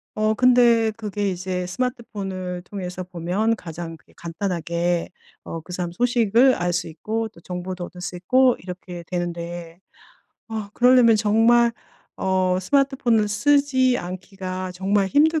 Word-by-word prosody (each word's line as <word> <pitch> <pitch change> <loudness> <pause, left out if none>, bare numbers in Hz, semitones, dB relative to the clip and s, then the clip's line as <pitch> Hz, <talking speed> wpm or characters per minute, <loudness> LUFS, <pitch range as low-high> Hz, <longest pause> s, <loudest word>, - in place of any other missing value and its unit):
어 215 0 +2
근데 240 -3 +5
그게 205 -2 -2
이제 180 0 -3
스마트폰을 190 -5 -4
통해서 185 -2 -6
보면 180 +6 -1
가장 165 -2 -7
그게 140 - -26
간단하게 170 -1 -2 0.3
어 165 - -6
그 180 +3 -10
사람 175 -1 -3
소식을 240 +3 +3
알 175 0 -1
수 175 0 -1
있고 220 +8 -3
또 190 - -18
정보도 180 0 -5
얻을 180 0 -11
수 180 - -5
있고 250 +8 +3
이렇게 180 -1 -8
되는데 175 -1 -5 0.7
아 215 -2 -5
그러려면 245 -2 +6
정말 230 +3 +4 0.4
어 185 -1 +1
스마트폰을 255 -2 +2
쓰지 260 +2 +3
않기가 185 0 -6
정말 195 +2 +1
힘들 310 +4 +3
190 Hz, 285 characters per minute, -23 LUFS, 180-230 Hz, 0.7 s, 그러려면